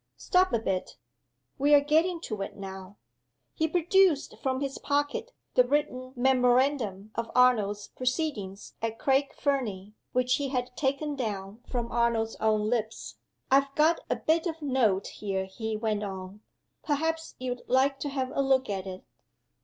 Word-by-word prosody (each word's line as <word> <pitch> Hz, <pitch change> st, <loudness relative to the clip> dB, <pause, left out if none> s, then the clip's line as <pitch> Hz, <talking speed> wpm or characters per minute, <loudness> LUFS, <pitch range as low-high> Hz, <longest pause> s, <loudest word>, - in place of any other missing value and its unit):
Stop 370 Hz, +1 st, +3 dB
a 235 Hz, -, +3 dB
bit! 195 Hz, -4 st, -3 dB, 0.6 s
We 290 Hz, +2 st, +6 dB
are -, -, +8 dB
getting 320 Hz, +5 st, +2 dB
to 215 Hz, -10 st, -4 dB
it 195 Hz, -, -5 dB
now." 190 Hz, 0 st, -8 dB, 0.6 s
He 320 Hz, -, +1 dB
produced 355 Hz, -1 st, +3 dB
from 260 Hz, -2 st, 0 dB
his 275 Hz, -1 st, -3 dB
pocket 290 Hz, +11 st, -1 dB, 0.2 s
the 250 Hz, -, +6 dB
written 255 Hz, -1 st, -1 dB
memorandum 250 Hz, -5 st, +2 dB
of 230 Hz, -1 st, -3 dB
Arnold's 210 Hz, -5 st, +3 dB
proceedings 250 Hz, -, -3 dB
at 225 Hz, 0 st, -2 dB
Craig 275 Hz, +1 st, +2 dB
Fernie, 210 Hz, -8 st, -2 dB, 0.2 s
which 250 Hz, 0 st, +2 dB
he 280 Hz, -1 st, -2 dB
had 250 Hz, -1 st, -2 dB
taken 285 Hz, +2 st, -1 dB
down 210 Hz, -3 st, -4 dB
from 240 Hz, -2 st, -3 dB
Arnold's 230 Hz, -1 st, +1 dB
own 215 Hz, -1 st, +1 dB
lips. 225 Hz, -1 st, -2 dB, 0.3 s
"I've 275 Hz, +1 st, +3 dB
got 315 Hz, +2 st, +4 dB
a -, -, +2 dB
bit 325 Hz, +2 st, +1 dB
of 325 Hz, -2 st, -5 dB
note 235 Hz, -9 st, +2 dB
here," 195 Hz, -2 st, -3 dB
he 220 Hz, +3 st, -4 dB
went 215 Hz, -1 st, -1 dB
on. 190 Hz, 0 st, -6 dB, 0.4 s
"Perhaps 320 Hz, +2 st, -1 dB
you'd 250 Hz, -1 st, -4 dB
like 270 Hz, +2 st, +3 dB
to 290 Hz, -, -3 dB
have 265 Hz, -2 st, -2 dB
a -, -, +1 dB
look 265 Hz, -4 st, +2 dB
at 195 Hz, -1 st, -3 dB
it?" 185 Hz, 0 st, -7 dB
250 Hz, 155 wpm, -28 LUFS, 215-285 Hz, 0.6 s, are